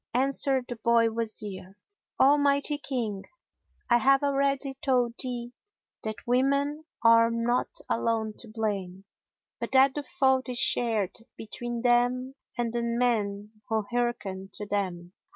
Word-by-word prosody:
Answered 270 Hz, 0 st, +2 dB
the 245 Hz, -, -6 dB
boy 230 Hz, 0 st, +3 dB
Wazir, 210 Hz, -4 st, -3 dB, 0.4 s
"O 275 Hz, +2 st, +6 dB
mighty 285 Hz, +1 st, +1 dB
King, 230 Hz, -9 st, -3 dB, 0.6 s
I 240 Hz, 0 st, +4 dB
have 275 Hz, +3 st, +4 dB
already 275 Hz, -1 st, +1 dB
told 250 Hz, -4 st, +2 dB
thee 245 Hz, -2 st, -4 dB, 0.5 s
that 215 Hz, -1 st, -6 dB
women 280 Hz, +5 st, +1 dB, 0.2 s
are 230 Hz, 0 st, +6 dB
not 230 Hz, +1 st, 0 dB, 0.2 s
alone 225 Hz, -2 st, 0 dB
to 235 Hz, -, -5 dB
blame, 200 Hz, -4 st, -4 dB, 0.5 s
but -, -, -5 dB
that 265 Hz, 0 st, +6 dB
the 295 Hz, -, -3 dB
fault 265 Hz, -5 st, +1 dB
is 250 Hz, -, -3 dB
shared 225 Hz, -6 st, +1 dB, 0.2 s
between 240 Hz, +2 st, -5 dB
them 245 Hz, +2 st, +2 dB, 0.2 s
and 235 Hz, -1 st, -1 dB
the 240 Hz, -, -1 dB
men 215 Hz, -3 st, -1 dB
who 220 Hz, -2 st, 0 dB
hearken 210 Hz, -6 st, -2 dB
to 210 Hz, -, -5 dB
them. 185 Hz, -3 st, -3 dB
240 Hz, 135 wpm, -27 LUFS, 220-265 Hz, 0.6 s, O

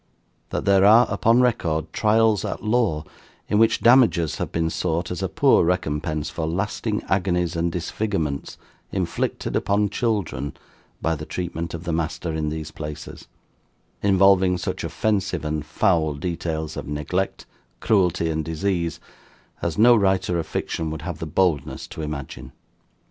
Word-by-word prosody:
That -, -, -3 dB
there 95 Hz, -1 st, +5 dB
are, 110 Hz, +4 st, +7 dB
upon 115 Hz, +4 st, +3 dB
record, 80 Hz, -10 st, 0 dB
trials 110 Hz, -1 st, +3 dB
at -, -, -4 dB
law 105 Hz, -9 st, +1 dB, 0.4 s
in 105 Hz, -, +2 dB
which 115 Hz, 0 st, +3 dB
damages 115 Hz, -, +4 dB
have -, -, -3 dB
been 80 Hz, 0 st, 0 dB
sought 85 Hz, 0 st, -1 dB
as 90 Hz, -, -4 dB
a -, -, -1 dB
poor -, -, +4 dB
recompense 75 Hz, -3 st, -1 dB
for 80 Hz, 0 st, -3 dB
lasting 105 Hz, +5 st, -2 dB
agonies 90 Hz, -2 st, 0 dB
and 85 Hz, +1 st, 0 dB
disfigurements 85 Hz, -4 st, -3 dB, 0.3 s
inflicted -, -, -2 dB
upon 100 Hz, 0 st, +1 dB
children 95 Hz, -, -2 dB, 0.5 s
by 80 Hz, -, +2 dB
the 75 Hz, -1 st, -6 dB
treatment 85 Hz, -2 st, -4 dB
of 85 Hz, -, -7 dB
the 85 Hz, -2 st, -2 dB
master 80 Hz, +1 st, -2 dB
in 80 Hz, -1 st, -1 dB
these 80 Hz, 0 st, -5 dB
places, 75 Hz, 0 st, -8 dB, 0.7 s
involving 95 Hz, -2 st, +4 dB
such 90 Hz, +1 st, -4 dB
offensive 95 Hz, +2 st, -1 dB
and 75 Hz, -1 st, -3 dB
foul 80 Hz, -3 st, +1 dB
details 80 Hz, 0 st, -3 dB
of -, -, -6 dB
neglect, 75 Hz, +6 st, -2 dB, 0.3 s
cruelty, 90 Hz, -5 st, +2 dB
and 80 Hz, 0 st, -1 dB
disease, 85 Hz, 0 st, -2 dB, 0.6 s
as 85 Hz, -2 st, -2 dB
no 120 Hz, +2 st, +7 dB
writer 95 Hz, -4 st, +1 dB
of 80 Hz, -, -4 dB
fiction 80 Hz, -1 st, -3 dB
would 80 Hz, 0 st, -6 dB
have 85 Hz, -1 st, -5 dB
the 80 Hz, -, -4 dB
boldness 85 Hz, -1 st, 0 dB
to -, -, -8 dB
imagine. 75 Hz, -3 st, -6 dB
85 Hz, 150 wpm, -23 LUFS, 80-100 Hz, 0.7 s, are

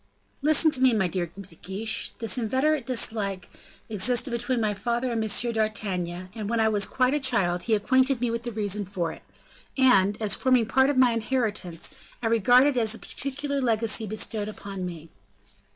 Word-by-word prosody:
"Listen 310 Hz, +2 st, +4 dB
to 260 Hz, -, 0 dB
me, 260 Hz, -2 st, +5 dB
my 205 Hz, -4 st, +1 dB
dear 175 Hz, 0 st, -2 dB
De 185 Hz, +4 st, -12 dB
Guiche, 200 Hz, +6 st, -4 dB
this 225 Hz, -3 st, 0 dB
inveterate 260 Hz, +4 st, 0 dB
dislike 215 Hz, -6 st, -1 dB, 0.4 s
existed 235 Hz, +5 st, +1 dB
between 240 Hz, +1 st, -1 dB
my 215 Hz, -2 st, 0 dB
father 240 Hz, +4 st, -2 dB
and 225 Hz, -1 st, -1 dB
M. 230 Hz, +2 st, +1 dB
d'Artagnan, 185 Hz, -5 st, -2 dB
and 215 Hz, -2 st, -5 dB
when 235 Hz, 0 st, 0 dB
I 220 Hz, -, +3 dB
was 205 Hz, -2 st, 0 dB
quite 255 Hz, +1 st, +1 dB
a 295 Hz, -, +1 dB
child, 195 Hz, -10 st, +1 dB
he 225 Hz, -, +1 dB
acquainted 260 Hz, +5 st, +2 dB
me 240 Hz, -1 st, -1 dB
with 230 Hz, 0 st, -3 dB
the 240 Hz, 0 st, -5 dB
reason 210 Hz, -1 st, -1 dB
for 180 Hz, -4 st, -3 dB
it, -, -, -12 dB, 0.6 s
and, 205 Hz, -7 st, +4 dB
as 215 Hz, -2 st, +1 dB
forming 255 Hz, -3 st, +2 dB
part 265 Hz, +4 st, +3 dB
of 285 Hz, -, 0 dB
my 255 Hz, -2 st, +5 dB
inheritance, 220 Hz, -7 st, -2 dB, 0.3 s
I -, -, -6 dB
regard 230 Hz, +3 st, +5 dB
it 285 Hz, -3 st, +1 dB
as 225 Hz, -1 st, +1 dB
a -, -, -9 dB
particular 280 Hz, +2 st, -4 dB
legacy 225 Hz, -2 st, +1 dB
bestowed 215 Hz, 0 st, -3 dB
upon 200 Hz, -3 st, -6 dB
me." 165 Hz, -2 st, -9 dB
225 Hz, 185 wpm, -26 LUFS, 200-255 Hz, 0.6 s, me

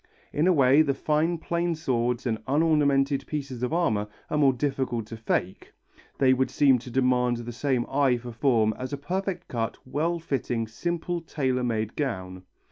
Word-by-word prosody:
In 155 Hz, +4 st, +2 dB
a -, -, +6 dB
way 140 Hz, -2 st, +5 dB
the 140 Hz, -3 st, +1 dB
fine 160 Hz, +4 st, +1 dB
plain 170 Hz, +1 st, -1 dB
swords 125 Hz, -6 st, -1 dB
and 110 Hz, -3 st, -1 dB
unornamented 140 Hz, -2 st, +2 dB
pieces 140 Hz, -5 st, -4 dB
of 125 Hz, -, -1 dB
armour 110 Hz, -12 st, +1 dB, 0.2 s
are 150 Hz, -, +1 dB
more 140 Hz, -2 st, +5 dB
difficult 130 Hz, -3 st, -2 dB
to 115 Hz, -, -8 dB
fake; 95 Hz, -4 st, -3 dB, 0.4 s
they 130 Hz, -1 st, +4 dB
would 130 Hz, 0 st, +1 dB
seem 135 Hz, -4 st, +4 dB
to 125 Hz, -, -10 dB
demand 125 Hz, -1 st, +2 dB
the 120 Hz, 0 st, -6 dB
same 125 Hz, 0 st, 0 dB
eye 135 Hz, -3 st, +2 dB
for 120 Hz, 0 st, -8 dB
form 115 Hz, -3 st, +2 dB
as 130 Hz, +2 st, -5 dB
a -, -, -1 dB
perfectly 185 Hz, +6 st, -3 dB
cut, 115 Hz, -2 st, -3 dB
well 155 Hz, +6 st, -1 dB
fitting, 130 Hz, -7 st, -2 dB
simple 170 Hz, +8 st, -3 dB
tailor 130 Hz, -6 st, -1 dB
made 110 Hz, -2 st, -2 dB
gown. 95 Hz, -10 st, -3 dB
130 Hz, 175 wpm, -26 LUFS, 120-150 Hz, 0.4 s, a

